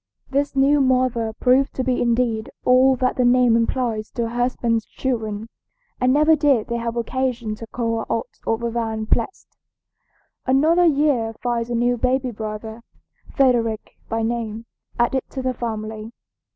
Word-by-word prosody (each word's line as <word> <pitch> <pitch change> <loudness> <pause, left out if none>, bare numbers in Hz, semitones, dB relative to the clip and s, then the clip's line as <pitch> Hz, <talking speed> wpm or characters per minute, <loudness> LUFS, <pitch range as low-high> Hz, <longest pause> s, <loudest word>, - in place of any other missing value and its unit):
This 280 +1 0
new 280 +2 +4
mother 255 -4 +1
proved 255 +4 +2
to 260 - -1
be 255 -1 0
indeed 235 -1 0 0.2
all 260 +1 +5
that 255 0 0
the 250 - +3
name 245 -1 +4
implies 230 -2 -1
to 235 - -1
her 230 - -2
husband's 240 -2 0
children, 220 -5 -3 0.5
and 250 0 +3
never 305 +3 +5
did 280 -7 +2
they 235 - -1
have 230 0 -3
occasion 240 -2 -2
to 230 - -9
call 230 -1 -2
her - - -4
aught 230 - -3
other 230 +1 0
than 225 -2 -2
blessed. 230 - -2 0.9
Another 315 +7 +4
year 280 -7 +2
finds 240 -1 -2
a 240 - -1
new 245 +1 +1
baby 255 +1 0
brother, 220 +1 -6 0.5
Frederick 235 -6 +1 0.2
by 225 0 -1
name, 225 -1 -3 0.3
added 240 +2 +1
to 265 - -5
the 255 0 0
family. 220 -2 -5
240 Hz, 155 wpm, -22 LUFS, 225-260 Hz, 0.9 s, all